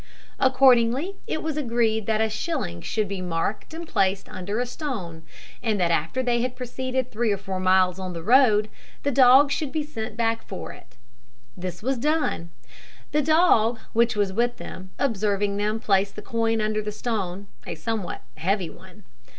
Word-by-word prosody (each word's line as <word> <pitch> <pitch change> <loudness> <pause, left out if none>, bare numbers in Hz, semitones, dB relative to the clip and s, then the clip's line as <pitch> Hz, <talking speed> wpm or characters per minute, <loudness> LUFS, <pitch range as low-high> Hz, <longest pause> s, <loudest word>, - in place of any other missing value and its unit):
Accordingly 260 +6 +4
it 315 - -2
was 315 -1 -2
agreed 230 -5 +1
that 220 -1 +2
a 220 - +3
shilling 215 - -3
should 215 -2 -1
be 195 -1 -4
marked 180 - -2
and 330 +1 -7
placed 195 -5 +1
under 200 +5 -4
a 245 - 0
stone, 225 - -5 0.4
and 220 -4 0
that 175 -2 +2
after 165 +11 0
they 240 -1 +1
had 250 +1 -2
proceeded 255 0 -3
three 225 0 0
or 200 - +1
four 195 -1 -5
miles 185 0 +3
on 185 -1 -4
their 165 -1 -6
road, 220 -2 +5 0.4
the 285 - +1
dog 265 +2 +6
should 285 0 -1
be 310 -1 -1
sent 220 -7 -6
back 225 -1 0
for - - -6
it. - - -18 0.6
This 180 0 -6
was 260 0 0
done 300 - 0 0.6
the 300 - +2
dog, 300 -8 +4 0.2
which 235 0 +3
was 200 -2 0
with 240 +3 +1
them, 185 0 -9
observing 205 -5 0
them 210 +2 0
place 195 -2 +2
the 210 - -9
coin 225 0 0
under 215 0 0
the 210 0 -4
stone, 205 -4 -3 0.2
a - - -4
somewhat 195 +2 -4
heavy 185 0 0
one. 190 +4 -16
220 Hz, 175 wpm, -25 LUFS, 195-255 Hz, 0.6 s, dog